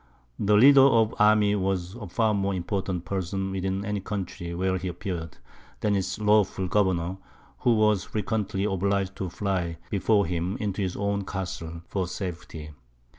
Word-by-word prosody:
The 105 +1 +3
leader 135 +4 +8
of 115 -5 +5
an - - -11
army 105 -1 +5
was 95 -2 -1
a 110 -3 -8
far 110 +4 +1
more 100 -1 0
important 95 -1 -3
person 95 +1 -2
within 95 +1 -2
any 105 0 -1
country 95 -3 -5
where 95 +1 0
he 95 - -4
appeared, 90 -2 -5 0.4
than 105 -1 +2
its 95 0 -1
lawful 105 -3 +2
governor, 95 -2 +1 0.4
who 120 -2 +3
was 105 -3 +3
frequently 105 -2 -2
obliged 100 -1 0
to 95 - -3
fly 90 -3 -2
before 100 +1 +2
him 90 +4 -2
into 105 -4 -2
his 95 -2 -2
own 100 0 -1
castles 85 -4 -5
for 95 -3 -2
safety. 85 -4 -6
95 Hz, 160 wpm, -26 LUFS, 90-105 Hz, 0.4 s, leader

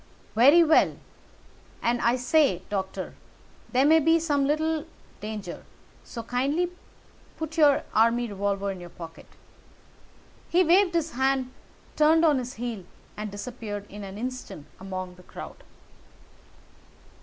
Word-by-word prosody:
"Very 280 +10 +7
well. 320 -1 +4 0.9
And, 240 +1 +1
I 235 +1 +3
say, 255 - +2
Doctor, 190 -1 -3 0.6
there 260 +2 +3
may 320 +2 +6
be 325 +2 +4
some 290 -4 +1
little 315 +1 0 0.3
danger, 210 -4 -6 0.4
so 230 - -7
kindly 280 +9 0 0.7
put 320 0 -5
your 295 -4 +5
army 230 +2 +3
revolver 200 -1 -1
in 190 - -7
your 175 0 -9
pocket." 165 -1 -11 1.2
He 360 +2 +4
waved 355 +1 +4
his 330 -1 0
hand, 265 0 0 0.4
turned 320 +2 +5
on 295 -4 +4
his 250 0 -6
heel, 230 -4 -4 0.3
and 210 0 -5
disappeared 205 -1 -6
in 205 0 -8
an 195 0 -8
instant 250 - -6
among 185 -1 -6
the - - -14
crowd. - - -10
250 Hz, 130 wpm, -26 LUFS, 205-310 Hz, 1.2 s, Very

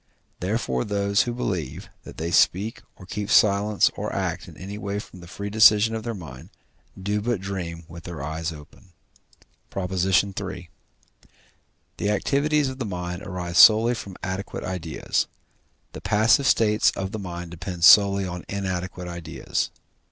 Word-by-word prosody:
Therefore 90 - -1
those 100 0 +1
who 120 - -1
believe, 90 - -3 0.2
that - - -11
they 85 +1 -3
speak 100 +6 +2
or 95 - -13
keep 105 +2 -5
silence 105 0 +4
or - - -4
act - - -3
in - - -13
any 100 +2 -7
way 100 -1 -3
from 100 -3 -9
the 85 - -12
free 100 +3 -6
decision 110 0 +6
of 110 - -3
their 115 0 -4
mind, 70 -9 -10 0.5
do 105 +2 -1
but 120 -1 -1
dream 90 -3 -5
with 85 0 -11
their 85 -5 -6
eyes 80 +3 -3
open. 80 +5 -14 0.8
PROP. 95 -1 -4
III. 95 -1 0 1.3
The 105 - -1
activities 140 +8 +1
of 130 0 -6
the - - -1
mind 90 -3 -5
arise 90 -3 -2
solely 110 +4 +8
from 100 -5 -7
adequate 95 +2 -4
ideas; 90 -3 -2 0.6
the - - -9
passive 110 +6 +3
states 105 -1 +4
of 95 0 -4
the 110 - -5
mind 85 -3 -6
depend 90 0 -6
solely 100 +1 +7
on 90 -1 -6
inadequate 95 -2 -4
ideas. 85 -2 -3
95 Hz, 155 wpm, -24 LUFS, 90-105 Hz, 1.3 s, solely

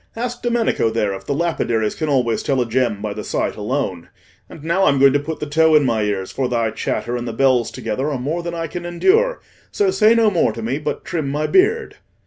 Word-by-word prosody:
Ask 240 +1 -4
Domenico 235 - +1
there 110 -3 -1
if 95 - -9
the 140 - -1
lapidaries 120 -10 0
can 155 -2 -3
always 125 -5 +1
tell 135 -2 0
a 125 - +1
gem 115 -3 0
by 105 -1 -3
the 105 +1 -6
sight - - -2
alone. 105 -6 -3 0.4
And 150 - -12
now 170 +4 +1
I'm 140 - +3
going 135 0 +6
to 145 - +3
put 155 +2 -5
the - - -3
tow 160 +2 +3
in 150 -2 +5
my 115 -4 +1
ears, 100 -2 -2
for 130 -2 -2
thy 115 -2 0
chatter 120 +2 -3
and 120 0 -4
the 115 - -4
bells 130 -1 +2
together 130 +3 -3
are 145 - -2
more 150 +7 -2
than 170 0 -5
I 165 0 -3
can 175 +2 -6
endure: 400 - +2 0.3
so 405 -2 +1
say 220 - +4
no 225 -2 +4
more 165 - +1
to 115 - -7
me, 130 +6 -2
but 150 0 -4
trim 155 -5 -2
my 150 +2 -1
beard." 435 - +2
140 Hz, 240 wpm, -20 LUFS, 115-170 Hz, 0.4 s, going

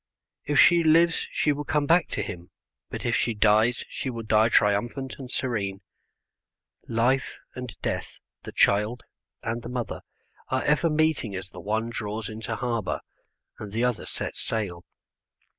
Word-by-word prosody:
If 145 - +2
she 170 -1 +7
lives 165 +1 +4
she 150 - +1
will 145 0 -2
come 150 0 +1
back 170 +3 +4
to 105 - -2
him, 90 -3 -7 0.4
but - - -6
if - - +2
she 115 - +1
dies 110 +3 +3
she 130 - -4
will 115 -2 -5
die 110 +1 +4
triumphant 120 +6 +1
and 130 -2 -7
serene. 100 -7 -2 1.1
Life 125 +4 +1 0.2
and 125 -3 -7
death, - - -3 0.2
the - - -8
child 105 +5 +2 0.4
and 115 +1 -2
the 115 - -7
mother, 125 -2 -4 0.5
are 130 0 0
ever 150 +3 +3
meeting 155 -9 +1
as 95 0 -6
the 90 - -10
one 110 +4 -1
draws 105 -1 -4
into 110 +1 -4
harbour 115 -4 -2 0.6
and 105 -2 -7
the 115 +3 0
other 125 -2 0
sets - - -4
sail. 95 -6 -3
115 Hz, 160 wpm, -26 LUFS, 105-135 Hz, 1.1 s, she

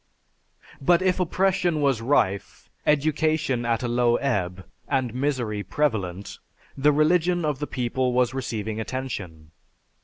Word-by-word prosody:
But 175 +5 +3
if 185 0 +2
oppression 180 -2 +1
was 135 -6 +1
rife, 100 -6 0 0.2
education 150 -4 +1
at 115 0 0
a - - 0
low 120 0 +2
ebb, 95 -9 -1 0.2
and 130 -4 0
misery 125 -6 -1
prevalent, 100 -5 -2 0.4
the 145 +2 +3
religion 170 +3 +2
of 150 -3 -1
the 145 - -3
people 125 0 -1
was 125 0 +2
receiving 110 -4 -3
attention. 100 -11 -5
130 Hz, 125 wpm, -25 LUFS, 110-150 Hz, 0.4 s, But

